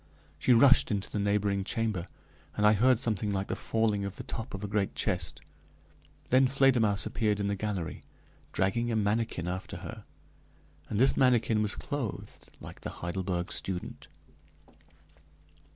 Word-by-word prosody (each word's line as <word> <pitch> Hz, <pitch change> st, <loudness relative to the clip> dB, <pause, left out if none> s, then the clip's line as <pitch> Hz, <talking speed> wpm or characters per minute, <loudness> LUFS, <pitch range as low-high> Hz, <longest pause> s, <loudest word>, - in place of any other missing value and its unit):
She 125 Hz, -, +2 dB
rushed 130 Hz, +3 st, +6 dB
into 100 Hz, -3 st, -2 dB
the 105 Hz, -, -2 dB
neighboring 100 Hz, -1 st, +1 dB
chamber, 105 Hz, -5 st, -2 dB, 0.5 s
and 105 Hz, -, +2 dB
I 105 Hz, -, +7 dB
heard 125 Hz, +4 st, +4 dB
something 110 Hz, -3 st, -1 dB
like 95 Hz, 0 st, -2 dB
the -, -, -1 dB
falling 110 Hz, -3 st, 0 dB
of 100 Hz, 0 st, -4 dB
the -, -, -7 dB
top 115 Hz, 0 st, -6 dB
of 95 Hz, -, -7 dB
a -, -, -2 dB
great 100 Hz, -1 st, -1 dB
chest; 85 Hz, -7 st, -2 dB, 0.9 s
then 130 Hz, +1 st, +5 dB
Fledermausse 125 Hz, -6 st, +3 dB
appeared 105 Hz, -3 st, 0 dB
in 100 Hz, -, 0 dB
the 100 Hz, -, 0 dB
gallery, 100 Hz, -5 st, -4 dB, 0.5 s
dragging 115 Hz, +5 st, 0 dB
a -, -, 0 dB
manikin 105 Hz, -4 st, 0 dB
after 90 Hz, +1 st, -4 dB
her, -, -, -8 dB, 0.9 s
and 105 Hz, -, -1 dB
this 135 Hz, +2 st, +4 dB
manikin 120 Hz, -4 st, +3 dB
was 105 Hz, -1 st, 0 dB
clothed 135 Hz, -8 st, -5 dB
like -, -, -11 dB
the -, -, -5 dB
Heidelberg 90 Hz, 0 st, -2 dB
student. 90 Hz, -2 st, -4 dB
105 Hz, 150 wpm, -29 LUFS, 95-115 Hz, 0.9 s, I